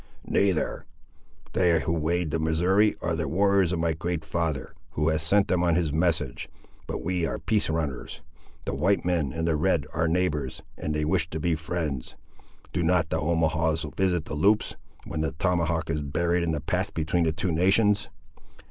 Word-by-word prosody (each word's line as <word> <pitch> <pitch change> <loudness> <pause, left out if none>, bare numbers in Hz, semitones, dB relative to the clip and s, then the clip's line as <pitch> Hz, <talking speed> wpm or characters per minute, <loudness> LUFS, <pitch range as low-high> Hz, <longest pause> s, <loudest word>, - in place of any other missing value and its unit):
'" - - -26
"Neither. 95 -5 0 0.7
They, 85 -3 +3
who 80 - -1
wade 85 0 0
the 80 - 0
Missouri, 90 +7 +3
are 85 -1 0
the 80 -1 -2
warriors 95 +2 +3
of 90 - 0
my 80 0 +1
great 80 0 -3
father, 80 -3 -2 0.2
who 75 +1 +1
has 80 -1 0
sent 100 +5 +3
them 90 -1 +1
on 85 -2 +3
his 80 -4 0
message; 80 -5 0 0.4
but - - -4
we 90 0 -1
are - - -3
peace 110 -6 0
runners. 75 -6 -3 0.4
The - - -2
white 95 -2 +1
men 85 -7 +1
and 80 +2 -2
the 80 - +2
red 75 - +1
are 85 +1 +1
neighbours, 80 -6 -1
and 75 - -3
they 75 0 0
wish 80 0 +1
to 80 - -4
be 85 +2 +1
friends.—Do 80 -1 -5
not 85 -1 +2
the 80 - -1
Omahaws 80 -1 +1
visit 90 -4 +1
the - - -6
Loups, 100 +8 +2 0.3
when 75 - -3
the 80 - -1
tomahawk 85 -1 0
is 75 -2 -1
buried 85 +5 0
in 85 - -1
the 80 -3 -1
path - - -2
between 85 +2 +1
the 80 - +2
two 85 +3 -2
nations?" 100 +5 +3
80 Hz, 185 wpm, -26 LUFS, 80-90 Hz, 0.7 s, They